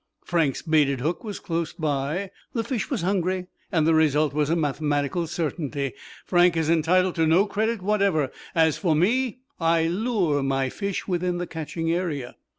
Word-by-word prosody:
Frank's 160 -6 0
baited 150 -5 +2
hook 160 - -2
was 210 -3 -5
close 165 -3 -3
by. 155 +5 -2 0.2
The 230 - 0
fish 230 -5 -3
was 235 -11 -2
hungry 185 -1 0 0.3
and 160 -5 +2
the 165 - +4
result 155 -2 +3
was 150 0 +1
a 165 - +2
mathematical 150 +1 0
certainty. 145 -4 -3 0.3
Frank 175 -1 +4
is 160 0 +1
entitled 175 +3 +3
to 160 -1 +1
no 175 +6 +5
credit 215 0 -1
whatever. 195 -9 +1 0.2
As 160 -2 +3
for 165 -5 +2
me, 245 +8 +1 0.2
I 165 -1 +3
lure 180 - +1
my 135 -1 0
fish 200 +6 -4
within 180 -1 0
the 175 - -2
catching 165 0 -3
area." 160 -8 -2
165 Hz, 165 wpm, -25 LUFS, 150-185 Hz, 0.3 s, no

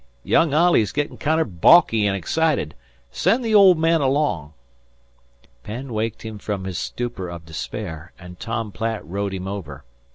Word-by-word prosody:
Young 165 - +3
Olley's 150 - +3
gittin' 145 +4 -3
kinder 160 +2 +1
baulky 110 - +4
an' 100 - 0
excited. 135 - 0 0.4
Send 230 - +1
the 225 - 0
old 195 -4 +7
man 165 0 +2
along." 130 - 0 1.1
Penn 125 +3 -7
waked 110 0 -3
him 110 -2 -7
from 100 -1 -4
his 95 -2 -4
stupor 115 -7 -4
of 85 -1 -9
despair, 80 0 -6
and 90 -1 -12
Tom 115 -2 -4
Platt 110 +1 -3
rowed 100 +3 -3
him 95 0 -6
over. 80 -9 -7
110 Hz, 155 wpm, -22 LUFS, 90-150 Hz, 1.1 s, old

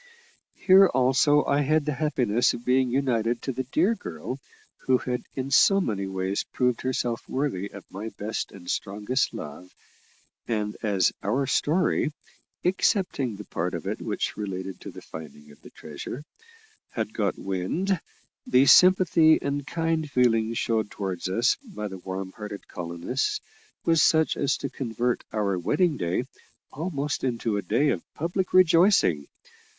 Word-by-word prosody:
Here 195 0 +8
also 135 +2 +3
I 145 - +2
had 155 +1 +2
the 150 - -1
happiness 125 -7 +1
of 120 - -10
being 130 0 +3
united 120 -3 0
to 135 - -2
the 130 +1 -4
dear 170 - +2
girl 90 - -6 0.5
who 130 -1 +5
had 125 -1 -3
in 135 +1 -3
so 195 +8 +6
many 100 - -2
ways 95 +1 -2
proved 125 -2 -1
herself 120 -2 -2
worthy 130 -8 -2
of 100 0 -11
my 105 +4 -5
best 105 +2 -3
and 90 -3 -13
strongest 105 +9 -1
love, 75 +5 -8 0.8
and 105 -2 -2
as 100 -4 +2
our 125 +8 0
story 155 +3 +1 0.5
excepting 180 - +1
that 105 +1 -11
part 90 +2 -2
of 85 - -6
it - - -3
which - - -2
related 95 -2 -5
to - - -7
the - - -11
finding 75 -1 -10
of 75 - -19
the - - -13
treasure 80 - -8 0.7
had 110 -2 -4
got 100 -4 -1
wind, 150 - -1 0.5
the 130 +2 +5
sympathy 180 -2 +6
and 140 0 -3
kind 165 -2 -1
feeling 115 -4 +2
shown 110 -1 0
towards 95 -4 -4
us 115 +7 +2 0.2
by 105 - -3
the 95 -2 -8
warm 95 +1 -5
hearted 105 -1 -8
colonists, 90 - -2 0.5
was 165 -2 +4
such 160 +1 +3
as 140 -1 0
to - - -4
convert 120 -1 -2
our 100 -4 0
wedding 155 - +1
day 85 -7 -1 0.5
almost 150 -2 -3
into 120 -4 -1
a 100 - -1
day 120 - +1
of - - 0
public 175 +4 -2
rejoicing. 170 - +4
125 Hz, 155 wpm, -26 LUFS, 100-145 Hz, 0.8 s, Here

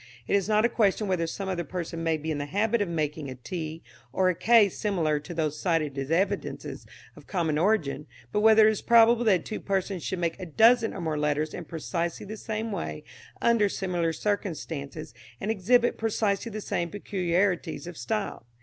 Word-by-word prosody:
It - - +1
is 200 +1 +1
not 215 +1 +4
a - - +3
question 210 -2 +1
whether 175 -3 0
some 195 +4 -5
other 180 -2 -2
person 165 0 -5
may 165 -1 +1
be 155 +1 -4
in 150 - -2
the 145 - -3
habit 210 +7 +1
of 200 - 0
making 150 -3 -2
a 130 - -6
t 160 +4 -6 0.3
or 185 +7 +2
a - - +2
k 225 +3 +5
similar 175 -7 0
to 150 - -10
those 155 -3 -2
cited 165 -6 0
as 135 0 -4
evidences 195 +5 -2 0.3
of - - -15
common 160 -5 0
origin, 160 -7 +1 0.2
but 210 - +1
whether 220 0 +7
it - - +5
is 215 - -4
probable 235 0 +5
that 190 -6 +3
two 215 - -4
persons 195 -2 -2
should 185 - -3
make 170 -2 -2
a 185 - -5
dozen 225 +7 +4
or 190 - -5
more 155 -2 -1
letters 150 +1 0
in 175 - -6
precisely 170 +2 -3
the 215 +2 -6
same 220 +1 -4
way 165 -5 -4 0.4
under 230 -3 +4
similar 175 -4 -1
conditions 160 - -4 0.3
and 210 - -1
exhibit 240 +4 +2
precisely 220 -1 0
the 215 +1 -5
same 170 -3 -2
peculiarities 180 -3 -1
of 175 0 -8
style. 120 -2 -3
180 Hz, 195 wpm, -27 LUFS, 160-210 Hz, 0.4 s, whether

